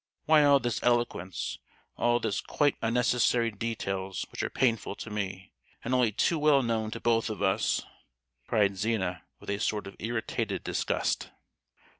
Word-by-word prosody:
Why 155 -1 +6
all 140 -1 +6
this 120 -2 -2
eloquence, 120 -7 0 0.4
all 120 0 +2
these 100 - -1
quite 145 -2 +1
unnecessary 120 0 +2
details, 95 -4 -3
which - - -4
are - - -1
painful 115 -5 0
to 110 - -8
me, 95 -2 -4 0.3
and 125 - -2
only 125 -3 +3
too 160 - +1
well 145 -2 +4
known 110 -2 -1
to - - -6
both 115 -1 +1
of 105 -2 -4
us?" 95 -1 +1 0.6
cried 100 -2 +2
Zina 95 -4 -1 0.2
with - - -5
a 100 - -2
sort 105 -1 -1
of 95 - -9
irritated 115 0 -2
disgust. - - -1
115 Hz, 155 wpm, -29 LUFS, 100-120 Hz, 0.6 s, Why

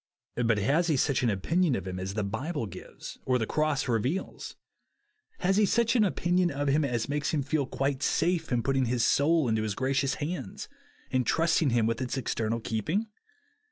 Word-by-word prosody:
But 115 -2 +3
has 145 - +2
he 155 -4 +2
such 140 +1 +1
an 120 - +2
opinion 150 - +1
of 95 -3 -4
him 90 0 -4
as 95 +2 -4
the 110 - 0
Bible 120 - -3
gives 95 -3 -10
or 130 -1 +2
the 115 - -1
cross 150 +1 0
reveals? 125 - -2 0.9
Has 195 +2 +2
he 210 - +5
such 230 +3 +2
an 230 - +5
opinion 180 -2 +1
of 145 -1 -1
him 150 +3 +3
as 120 -5 -1
makes 145 +1 -1
him 145 - 0
feel 145 -1 -1
quite 135 0 -1
safe 165 +1 0
in 120 -2 +1
put 135 - +1
ting 135 -1 +2
his 120 -1 +1
soul 155 0 +3
into 110 -1 +1
his 110 -2 -2
gracious 135 +1 0
hands, 155 - -5 0.4
and 130 -1 +2
trusting 165 +3 +2
him 120 -2 +2
with 115 +3 -1
its 130 +1 -2
eternal 115 -2 -1
keeping? 155 - -2
135 Hz, 195 wpm, -28 LUFS, 115-160 Hz, 0.9 s, he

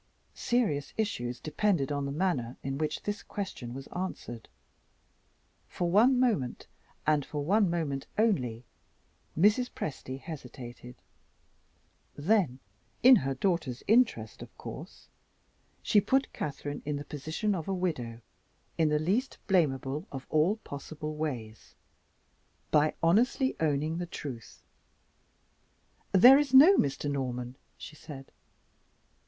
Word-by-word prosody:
Serious 165 - -1
issues 125 - -2
depended 155 -3 0
on 140 -1 -1
the - - -3
manner 145 -7 -1
in 135 +1 -3
which 155 -1 -2
this 205 +1 -3
question 190 - -6
was 135 +2 -7
answered. 175 -11 -5 1.2
For 175 -1 -2
one 245 +7 +5
moment, 210 - 0 0.4
and 150 -2 +3
for 145 +1 -4
one 200 +2 +3
moment 155 -5 -2
only, 125 - +1 0.7
Mrs. 210 +8 +4
Presty 135 -3 -6
hesitated. 125 -5 -9 1.2
Then 165 - +1 0.5
(in 255 0 +9
her 135 -5 -2
daughter's 160 -6 -1
interest, 220 - +2
of - - -12
course) - - -9 0.8
she 205 - +4
put 265 +6 +1
Catherine 145 0 -5
in 150 0 -2
the 145 +1 -5
position 155 +8 -2
of 165 -5 -4
a 195 - -1
widow, 125 -11 -3 0.6
in 160 -2 +4
the 150 - +2
least 200 - 0
blamable 150 -4 0
of 135 -1 -7
all 155 +7 +3
possible 150 +2 -6
ways, 120 -8 -5 1.0
by 150 0 +3
honestly 240 +9 +3
owning 155 +1 0
the 175 - -3
truth. 130 -9 -8 1.5
"There 250 +9 +8
is 280 -3 +1
no 320 +9 +9
Mr. 140 - 0
Norman," 125 -3 -3 0.2
she 150 - -10
said. 135 -3 -11
155 Hz, 120 wpm, -29 LUFS, 135-200 Hz, 1.5 s, in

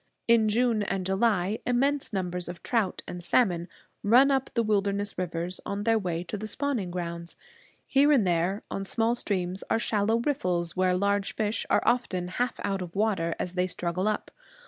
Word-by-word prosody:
In 230 -2 +5
June 230 0 +2
and 195 -2 -2
July 195 +1 +1
immense 270 +3 +1
numbers 180 -3 -2
of 175 - -8
trout 220 -6 0
and 175 0 -6
salmon 175 -4 +2 0.3
run 250 +7 +5
up 270 -1 +1
the 235 - +3
wilderness 205 -1 0
rivers 175 0 -3
on 200 +1 -3
their 225 0 +3
way 175 -3 -2
to 205 +3 -5
the 215 - -4
spawning 240 -5 -2
grounds. 170 -1 -5 0.5
Here 280 +2 +4
and 255 -9 +4
there, 180 +3 0
on 195 - -3
small 225 +4 +1
streams, 190 -5 -2
are - - +3
shallow 220 0 +1
riffles, 180 - -1
where 185 -1 +2
large 200 +1 0
fish 215 0 -1
are - - +3
often 185 -8 0
half 245 +6 -2
out 195 -1 -1
of 175 0 -7
water 195 -6 +1
as 180 - -4
they 180 0 +1
struggle 180 +2 -2
up. 215 - -2
200 Hz, 180 wpm, -27 LUFS, 180-225 Hz, 0.5 s, In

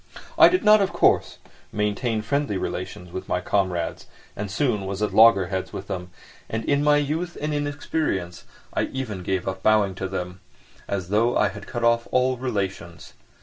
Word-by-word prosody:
I - - +9
did 365 - +1
not, 215 0 +7
of 195 - +1
course, - - +2 0.3
maintain 105 +2 -1
friendly 140 -3 -1
relations 90 -1 -5
with 95 - -6
my 90 - +1
comrades 90 -3 -1 0.3
and 105 0 -4
soon 105 -4 0
was 100 +2 -3
at 105 - -1
loggerheads 100 -4 +4
with 95 - -6
them, 90 -3 -5 0.4
and 110 0 -3
in 140 0 +2
my 150 0 +5
youth 160 +5 -2
and 150 +1 -2
inexperience 145 - -2 0.3
I - - +1
even 115 -8 -5
gave 95 0 -2
up 95 0 -3
bowing 105 -2 +3
to 95 - -1
them, 90 -1 -5 0.5
as 95 -3 -3
though 115 +4 +2
I 105 - +3
had 100 +1 -10
cut 120 -2 -4
off 115 0 +2
all 130 0 +2
relations. 95 -8 -4
105 Hz, 175 wpm, -24 LUFS, 95-130 Hz, 0.5 s, I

